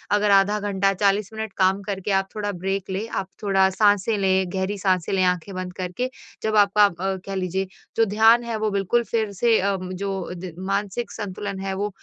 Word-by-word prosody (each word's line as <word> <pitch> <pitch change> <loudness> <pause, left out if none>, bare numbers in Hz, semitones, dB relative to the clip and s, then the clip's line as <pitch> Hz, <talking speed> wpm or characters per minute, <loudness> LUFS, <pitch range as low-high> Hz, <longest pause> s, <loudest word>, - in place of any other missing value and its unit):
अगर 205 0 +2
आधा 200 +2 +4
घंटा 195 -1 +1
40 200 +1 +1
मिनट 220 -2 -5
काम 190 +1 +3
करके 195 0 -3
आप 195 0 +2
थोड़ा 205 -1 -2
ब्रेक 195 +1 -3
लें, 195 +4 -3
आप 195 - -3 0.2
थोड़ा 195 -1 +3
साँसें 205 +2 +2
लें 190 -2 +2
गहरी 190 +2 -1
साँसें 185 -3 0
लें 190 -1 +2
आँखें 180 +2 -1
बंद 185 -1 -5
करके, 185 +8 -3 0.3
जब 220 0 0
आपका 205 0 +5
आप 180 -4 +2
अ, 190 0 0
कह 195 0 -5
लीजिए 190 +1 -2 0.3
जो 225 - +5
ध्यान 225 +3 +5
है 235 -1 -3
वो 215 0 0
बिल्कुल 200 +4 +1
फिर 220 -3 -1
से 225 +3 +3
उम, 185 -1 -5
जो 195 -1 -4
द 175 -1 -7
मानसिक 200 +4 -2
संतुलन 200 -1 -5
है 195 0 -3
वो 205 +2 -1
195 Hz, 205 wpm, -23 LUFS, 190-210 Hz, 0.3 s, आपका